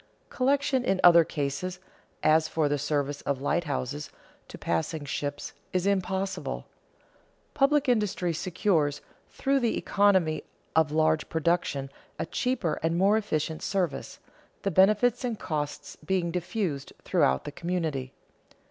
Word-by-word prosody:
Collection 270 0 +1
in 190 -5 +1
other 170 -1 +8
cases, 155 +5 -3 0.4
as 155 +1 +4
for 155 -1 +1
the 145 0 0
service 145 0 -1
of 140 -2 -2
lighthouses 145 -1 -2 0.4
to - - -10
passing 145 - -2
ships, 145 +1 -4 0.2
is 185 0 +1
impossible. 190 -1 -1 0.9
Public 290 +1 +3
industry 210 -7 +1
secures, 165 -4 0 0.3
through 275 0 +1
the 235 -3 0
economy 185 -7 +2 0.3
of 160 -2 +3
large 155 0 +2
production, 160 -4 0 0.3
a - - -2
cheaper 235 -11 -1
and 165 +1 0
more 195 +4 +4
efficient 160 -7 -1
service, 180 -7 -2 0.5
the 195 - 0
benefits 210 - +4
and 240 -3 -2
costs 150 -5 -4
being 170 +1 -1
diffused 175 -4 -3
throughout 65 0 +2
the - - -6
community. 160 -6 -3
170 Hz, 125 wpm, -28 LUFS, 145-200 Hz, 0.9 s, other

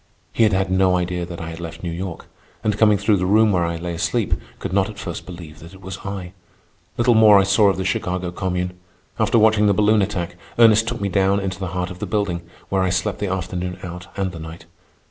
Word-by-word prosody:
He - - 0
had 110 -2 +5
had 95 -1 0
no 95 0 +3
idea 90 -1 -2
that 85 -1 -7
I 80 0 -6
had 80 - -8
left 85 0 -8
New 85 - -3
York, 90 0 -6 0.4
and, 105 -1 +1
coming 105 -1 +4
through 105 +1 +2
the 90 0 -1
room 110 +2 +4
where 90 -3 +2
I 85 0 -2
lay 85 +1 -4
asleep, 90 +3 -1 0.2
could - - -5
not 100 +1 +2
at 105 - -10
first 85 -4 -6
believe 85 -4 -10
that 85 +4 -12
it 95 - -15
was 95 +1 -7
I. 95 -3 -6 0.6
Little 120 +1 +4
more 110 -2 +7
I 100 - +5
saw 100 +1 +4
of 95 - 0
the 95 - -3
Chicago 90 -2 -2
Commune. 90 0 -2 0.5
After - - +3
watching 110 -1 +4
the 100 - +3
balloon 105 +1 +4
attack, 90 -4 -3 0.2
Ernest 115 -1 +6
took 120 0 -3
me 100 - 0
down 95 +1 +2
into 95 -2 -4
the 95 - -3
heart 90 +1 -2
of 90 - -9
the 105 - -4
building, 100 -4 -1 0.3
where 95 -1 +1
I 95 - +1
slept 95 +2 -1
the 100 -2 -2
afternoon 90 -1 -3
out 90 0 -7
and 95 -2 -1
the 85 - -9
night. 80 +1 -9
95 Hz, 240 wpm, -21 LUFS, 90-105 Hz, 0.6 s, more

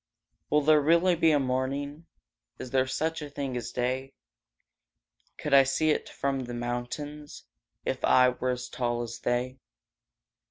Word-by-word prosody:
Will 150 - +3
there 155 0 +5
really 170 +4 +4
be 165 -1 +3
a 150 -2 +4
morning? 140 +4 -2 0.5
Is 125 - -8
there 130 -1 +2
such 160 +4 -2
a 150 - -6
thing 140 -3 -4
as 120 -1 -4
day? 130 +2 -2 1.2
Could 150 - -3
I 140 - +9
see 135 +4 +1
it - - -1
from 135 -2 -2
the 120 0 -6
mountains 125 +5 -5 0.4
If - - -2
I 125 0 +6
were 130 0 -3
as 125 0 -2
tall 120 -1 -2
as 115 0 -7
they? 125 +2 -1
135 Hz, 155 wpm, -28 LUFS, 125-150 Hz, 1.2 s, I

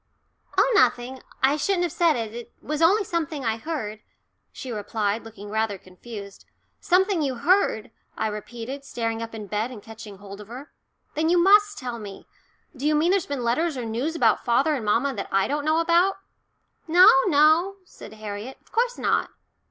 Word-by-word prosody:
"Oh, - - +5
nothing 255 - +2 0.2
I 275 +3 +4
shouldn't 355 +4 0
have 345 - -1
said 335 -2 +2
it 225 -2 -4
it 240 0 -9
was 305 +1 -4
only 395 +6 +4
something 320 -6 -3
I 225 0 0
heard," 225 -6 -5 0.5
she 255 - -8
replied, 210 0 -2
looking 205 -2 -10
rather 220 -2 -1
confused. 200 +2 -11 0.4
"Something 375 -1 +2
you 270 -3 -1
heard," 300 - +1 0.3
I - - -1
repeated, 230 +5 -6
starting 230 -4 -3
up 230 0 -6
in 215 -2 -7
bed 210 +4 -2
and 250 -4 -9
catching 220 -1 -11
hold 200 +1 -10
of 205 - -12
her. 255 +6 -10 0.4
"Then 315 +2 0
you 355 - +4
must 415 +3 +5
tell 245 -3 -5
me. 200 -2 -10 0.5
Do 280 +3 -2
you 305 - +3
mean 320 +4 +3
there's 390 -2 +1
been 280 -3 -3
letters 285 +6 0
or 245 - -4
news 245 +9 -2
about 230 -9 +2
father 265 +6 +2
and 265 -6 -3
mamma 240 +7 +1
that 200 - -5
I 195 0 +2
don't 290 +1 -2
know 310 +1 +2
about?" 345 +4 +3 0.7
"No, 350 +3 +7 0.2
no," 315 +4 +4
said 215 - -13
Harriet. 215 +3 -7
"Of - - -30
course 485 +1 0
not." - - 0
255 Hz, 185 wpm, -24 LUFS, 220-325 Hz, 0.7 s, No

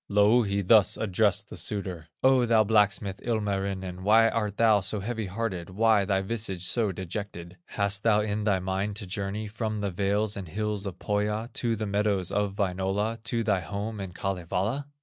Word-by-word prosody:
Louhi 105 0 +3
thus 105 +1 +5
addressed 100 0 +1
the - - -6
suitor: 95 -6 -4 0.2
"O 130 -2 +5
thou 115 -1 +5
blacksmith, 105 -2 +1
Ilmarinen, 100 -5 -2
Why 110 +3 +5
art 105 -3 -2
thou 110 -3 +4
so 100 +3 -2
heavy 110 +1 -3
hearted, 95 -3 -3
Why 105 +1 +3
thy 95 -1 +1
visage 95 -4 -3
so 110 +2 0
dejected? 90 -1 -6
Hast 100 -1 0
thou 105 -1 +3
in 105 0 -2
thy 105 -2 +2
mind 95 +2 -2
to 100 - -6
journey 100 +3 -3
From 110 0 -3
the 100 -1 -1
vales 100 +3 0
and 95 -3 -6
hills 105 +3 -2
of 95 -2 -6
Pohya, 105 +4 -1
To 115 -2 0
the 110 0 -3
meadows 100 -2 0
of 105 -1 -1
Wainola, 100 +3 -1
To 115 0 -1
thy 105 -4 +2
home 100 +4 -5
in 95 -2 -5
Kalevala?" 95 +8 -2
105 Hz, 175 wpm, -27 LUFS, 95-110 Hz, 0.2 s, thus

